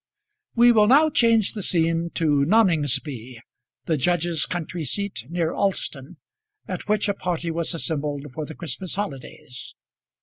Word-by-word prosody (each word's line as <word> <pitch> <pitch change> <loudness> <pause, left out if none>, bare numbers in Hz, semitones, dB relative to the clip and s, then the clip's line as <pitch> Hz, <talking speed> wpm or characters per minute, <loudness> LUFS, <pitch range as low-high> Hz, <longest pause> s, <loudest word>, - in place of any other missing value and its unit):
We 240 +1 +6
will 215 -2 +5
now 300 +6 +5
change 230 -5 +3
the 210 - -5
scene 165 -1 +1
to 145 -4 +2
Noningsby, 145 - +1 0.5
the 160 0 +1
judge's 170 +1 0
country 175 -1 -4
seat, 190 - -3
near 170 -1 -1
Alston, 180 -5 -2 0.5
at 185 +2 -6
which 210 0 +2
a 200 - +1
party 175 -3 -3
was 170 +1 -2
assembled 150 -3 -2
for 155 0 -5
the 160 - -9
Christmas 175 +2 -5
holidays. 135 -9 -7
170 Hz, 140 wpm, -24 LUFS, 150-200 Hz, 0.5 s, We